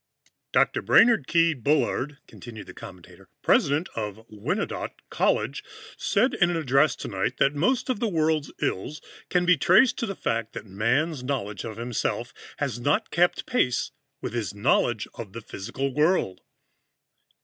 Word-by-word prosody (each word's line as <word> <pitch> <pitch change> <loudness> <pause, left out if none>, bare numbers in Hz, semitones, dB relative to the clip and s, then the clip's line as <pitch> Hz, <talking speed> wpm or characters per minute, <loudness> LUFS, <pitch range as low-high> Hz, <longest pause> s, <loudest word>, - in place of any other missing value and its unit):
"Dr. - - +2
Brainard 230 - +5
Keyes 165 -1 +3
Bullard," 145 +1 0
continued 110 -3 -10
the - - -11
commentator, 90 -3 -13
"President 145 +6 +3
of 110 0 -5
Wyandotte 105 -1 -3
College, - - 0 0.3
said 230 +7 +1
in 175 - +3
an 175 - 0
address 145 0 +3
tonight 100 +6 -3
that 135 - +3
most 245 - +1
of 255 -5 -1
the 235 - 0
world's 155 -5 0
ills 145 +11 -2 0.3
can 180 -1 +2
be 180 -1 +5
traced 190 - +4
to 230 - -1
the 195 - -4
fact 115 -5 -2
that 115 -2 -7
Man's 125 - 0
knowledge 120 -7 -3
of 110 -2 -7
himself 120 0 -2 0.2
has 135 -5 -2
not 145 +5 0
kept 175 +1 +2
pace 125 - 0 0.3
with - - -5
his 115 -4 -3
knowledge 100 - +1
of 105 -5 -9
the 115 - -7
physical 120 +6 -4
world." 150 - +1
140 Hz, 150 wpm, -26 LUFS, 115-165 Hz, 0.3 s, Brainard